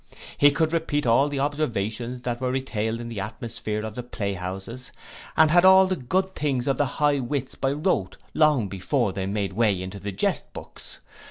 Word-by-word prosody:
He 145 - +6
could 160 +2 0
repeat 160 -3 0
all 130 +5 +4
the 140 -1 -3
observations 125 -4 -2
that 120 -1 -3
were 130 - 0
retailed 115 -4 -2
in 120 - -6
the 115 -3 -5
atmosphere 110 0 -4
of 110 - -6
the 125 - -5
playhouses, 100 +1 -5 0.5
and 160 -1 +6
had 175 +1 +6
all 190 0 +8
the 185 0 0
good 185 +7 -1
things 135 -5 -1
of 135 - +1
the 145 - +2
high 145 -1 +3
wits 135 +1 -2
by 135 - -1
rote 145 - -1 0.2
long 150 -9 +3
before 100 +3 -1
they 95 -1 -3
made 100 -1 -2
way 105 -3 +2
into 95 +2 -6
the 100 +1 -5
jest 95 - -1
books. - - -9
125 Hz, 190 wpm, -25 LUFS, 105-145 Hz, 0.5 s, all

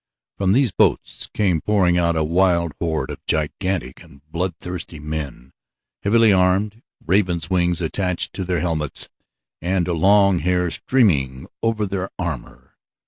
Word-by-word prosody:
From 95 -1 +2
these 130 +1 +3
boats - - 0
came 90 -7 +1
pouring 95 -4 +2
out 85 -1 +2
a 80 - +1
wild 85 0 +2
horde 80 -2 -2
of - - -9
gigantic 90 +4 -2
and 70 0 -17
bloodthirsty 90 -1 -4
men, 75 -4 -5 0.5
heavily 110 +1 +4
armed, 95 +4 +1 0.2
ravens' 90 -3 +1
wings 90 -1 +1
attached 90 +2 -2
to 95 - -4
their 90 -3 -1
helmets 80 -4 -2 0.5
and 90 0 0
long 95 +2 +4
hair 90 +1 0
streaming 70 - +1 0.2
over 115 -2 0
their 95 -1 -3
armor. 65 -8 -6
90 Hz, 135 wpm, -21 LUFS, 80-95 Hz, 0.5 s, heavily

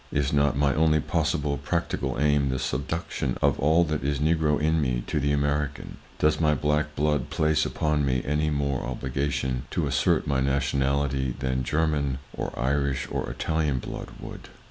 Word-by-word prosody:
Is 70 -1 0
not 70 -1 +2
my 70 -2 +3
only 75 +2 +3
possible 70 0 0
practical - - -2
aim 75 -2 +3
the 65 - -1
subduction 65 +1 -2
of - - +2
all 80 +4 +4
that 75 -4 -2
is 70 +1 0
Negro 80 -1 +2
in 80 +1 +2
me 60 -3 0
to - - -1
the 70 +1 +1
American? 75 0 -1 0.2
Does 75 +1 +2
my 75 -1 +3
black 75 +2 0
blood 75 0 0
place 80 0 +1
upon 75 -1 0
me 65 -2 0
any 75 +2 +1
more 70 -3 -1
obligation 65 0 -2
to - - -1
assert 70 -2 +2
my 70 -2 +1
nationality 70 -1 0
than 65 -1 -1
German, 75 -2 0 0.2
or - - -3
Irish 70 +1 0
or - - -2
Italian 80 -4 -1
blood - - -6
would? - - -9
70 Hz, 165 wpm, -26 LUFS, 65-75 Hz, 0.2 s, all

